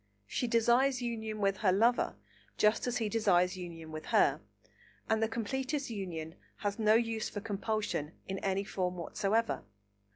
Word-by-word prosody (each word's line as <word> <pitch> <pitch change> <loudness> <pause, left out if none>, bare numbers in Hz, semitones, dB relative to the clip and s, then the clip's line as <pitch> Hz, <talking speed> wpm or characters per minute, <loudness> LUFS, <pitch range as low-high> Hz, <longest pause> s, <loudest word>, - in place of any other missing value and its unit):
She 245 - -2
desires 245 +3 +3
union 220 -3 -3
with 195 -1 +2
her 200 -5 +3
lover, 230 +6 +3 0.4
just 215 +3 +3
as 245 0 0
he 225 -2 0
desires 190 -5 +3
union 165 -3 -8
with 155 0 -7
her, - - +3 0.7
and 220 0 +2
the 225 - +3
completest 265 +5 -2
union 170 -6 -5 0.3
has 205 +2 -1
no 215 0 +5
use 225 -1 0
for 205 - -5
compulsion 205 -6 -2
in 190 0 -3
any 195 0 0
form 180 -2 -2
whatsoever. 210 +6 0
215 Hz, 155 wpm, -32 LUFS, 190-230 Hz, 0.7 s, no